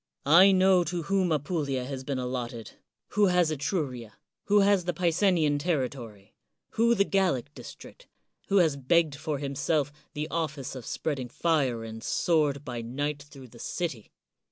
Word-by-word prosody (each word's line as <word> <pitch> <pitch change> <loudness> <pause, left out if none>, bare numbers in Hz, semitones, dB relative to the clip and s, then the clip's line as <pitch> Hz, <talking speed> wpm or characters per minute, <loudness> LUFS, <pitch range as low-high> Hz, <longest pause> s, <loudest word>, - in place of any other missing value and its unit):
I 175 +7 +7
know 185 -1 +4
to 170 +1 -3
whom 190 0 +1
Apulia 145 -4 -1
has 130 0 -6
been 135 0 -3
allotted, 125 -3 -4 0.4
who 205 -1 +3
has 180 -3 +2
Etruria, 135 - -3 0.3
who 205 0 +4
the 180 -2 -2
Picenian 170 -4 +2
territory, 125 - -3 0.4
who 235 +1 +3
the 200 - +4
Gallic 175 -9 0
district, - - -12 0.4
who 200 - +2
has 160 -6 +3
begged 155 +3 +2
for 155 0 -3
himself 140 +1 -1 0.2
the 150 +1 -3
office 150 -5 -3
of 130 -4 -8
spreading 135 -5 -3
fire 135 -6 0
and 115 0 -8
sword 150 -4 +1
by 120 -4 -5
night 145 +5 -3
through 135 -3 -13
the 120 - -16
city. 140 -10 -4
150 Hz, 150 wpm, -28 LUFS, 130-175 Hz, 0.4 s, I